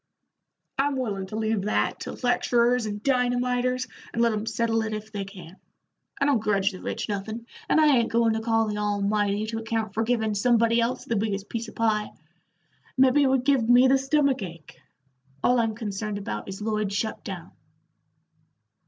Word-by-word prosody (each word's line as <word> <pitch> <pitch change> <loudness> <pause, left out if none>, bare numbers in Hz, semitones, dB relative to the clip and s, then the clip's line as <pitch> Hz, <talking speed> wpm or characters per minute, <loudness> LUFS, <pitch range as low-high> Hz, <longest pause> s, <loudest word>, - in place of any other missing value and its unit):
"I'm 280 0 +2
willin' 200 -7 -3
to 210 - -7
leave 220 -1 0
that 210 - 0
to - - -5
lecturers 245 -1 +2
and 205 0 -5
dynamiters, 250 -1 +1 0.3
and - - -4
let 235 -1 +3
'em 215 +1 -3
settle 225 0 0
it 220 -1 -2
if 215 0 -8
they 200 -2 -4
can. 190 -2 -12 0.6
I - - +2
don't 280 -5 +3
grudge 200 -1 +1
the 185 - -10
rich - - -4
nothin', 215 +3 -4 0.2
and - - +4
I 300 -4 +5
ain't 230 -1 +1
goin' 230 -1 +3
to 220 - -1
call 225 0 +2
the 210 0 -3
Almighty 205 0 0
to 225 +1 -4
account 225 -2 -2
for 220 - 0
givin' 225 -2 0
somebody 230 +2 +3
else 235 +2 -1
the 230 - -1
biggest 205 -1 -2
piece 230 0 -4
of - - -12
pie; 215 -2 +1 0.9
mebbe 260 +1 +5
it 280 - +4
would 260 -1 +1
give 260 -5 +2
me 245 +2 +7
the 270 +1 +4
stomach 275 -1 +2
ache. 165 -4 -9 0.6
All 250 0 +4
I'm 225 -2 0
concerned 210 -1 -4
about 105 - -5
is 195 +2 -6
Lloyd's 215 -2 -1
shut 220 +2 -2
down." - - -7
225 Hz, 185 wpm, -26 LUFS, 210-245 Hz, 0.9 s, me